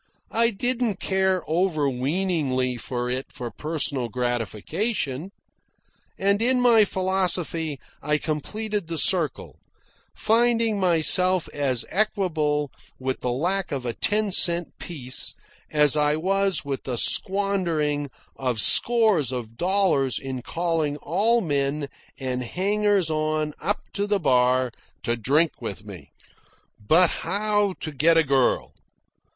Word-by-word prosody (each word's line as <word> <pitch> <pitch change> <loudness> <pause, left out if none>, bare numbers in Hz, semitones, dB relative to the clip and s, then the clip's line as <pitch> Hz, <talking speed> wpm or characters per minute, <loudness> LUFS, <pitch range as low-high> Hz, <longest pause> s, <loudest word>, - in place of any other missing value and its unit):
I 230 +1 +4
didn't 240 0 -1
care 190 -2 0
over 160 -3 0
weeningly 135 -2 -1
for 120 +1 -4
it 130 +2 -3
for 120 -2 -6
personal 145 -5 -1
gratification; 125 - -2 0.9
and 200 +2 +1
in 250 +2 +2
my 235 -3 +5
philosophy 180 -6 -1 0.2
I 150 0 +1
completed 200 +6 -3
the 165 -1 -4
circle, 165 -4 +1 0.6
finding 230 -1 +2
myself 180 +1 +4
as 135 -5 +1
equable 160 -8 0 0.3
with 130 0 -3
the 125 - -2
lack 180 +8 -1
of 135 -3 -3
a 120 - -2
ten 210 - 0
cent 175 -2 +2
piece 130 -7 -3 0.3
as 150 -1 +4
I 150 0 +2
was 195 +2 0
with 140 -2 -4
the 125 -2 -3
squandering 170 - 0 0.3
of 125 -4 -2
scores 215 - +3
of 115 -3 -6
dollars 175 -6 +1
in 130 -2 -5
calling 165 0 -1
all 210 +11 +2
men 140 -3 -1 0.3
and 130 -2 -3
hangers 195 - 0
on 155 0 -1
up 205 +1 -1
to 205 0 -2
the 205 -1 +1
bar 130 -4 +2 0.3
to 120 - 0
drink 145 +8 +1
with 105 -2 -6
me. 90 -9 -11 0.7
But 160 - +4
how 205 +1 0
to 155 - -4
get 155 +4 +3
a 165 - +5
girl? 135 -3 +1
160 Hz, 125 wpm, -24 LUFS, 135-195 Hz, 0.9 s, my